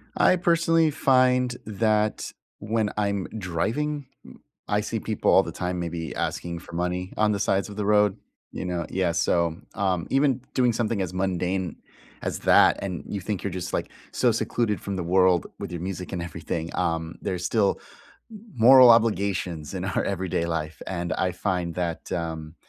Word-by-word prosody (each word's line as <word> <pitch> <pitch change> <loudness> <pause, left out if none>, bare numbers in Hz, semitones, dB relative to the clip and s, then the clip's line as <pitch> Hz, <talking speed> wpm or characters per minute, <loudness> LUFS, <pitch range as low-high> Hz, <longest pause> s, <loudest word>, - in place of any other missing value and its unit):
I - - +5
personally 165 -2 +3
find 125 -3 +3
that 110 0 0 0.3
when 110 0 0
I'm 100 -2 0
driving, 125 - -2 0.2
m - - -14 0.3
I - - +1
see - - -3
people - - 0
all - - +6
the - - -6
time 90 0 -3
maybe 85 -3 -4
asking 85 -1 -3
for 85 - -14
money 90 +2 -2
on 105 0 +3
the 100 - -1
sides 100 0 0
of 100 - -9
the 105 - -1
road, 105 -1 +3 0.3
you - - -5
know? 90 -2 -2
Yeah, 90 -2 0
so, 85 -1 +1 0.2
um, 95 -5 0
even 135 -2 +2
doing 125 -2 +3
something 115 -3 -1
as 90 -1 -3
mundane 95 -1 -1 0.5
as - - -2
that - - +5
and 90 -3 -4
you 100 - -4
think 105 0 -3
you're 100 - -2
just, 90 -1 -5
like, - - -2 0.2
so - - +2
secluded 105 -6 -1
from 100 - -4
the 90 - -3
world 90 0 +3
with - - -6
your 85 -1 -5
music 90 0 -5
and 90 - -3
everything 85 0 -4
um, 80 0 -1
there's 90 -1 -3
still 105 -2 +1 0.5
m 215 0 -13
moral 125 +2 +8
obligations 100 -8 +2
in 95 0 -3
our 95 - -1
everyday 95 -3 -1
life, 80 -3 -4
and 85 -2 -2
I 90 -1 0
find 90 -2 -2
that, 85 -2 -3
um, 80 -2 -4
95 Hz, 175 wpm, -25 LUFS, 85-110 Hz, 0.5 s, moral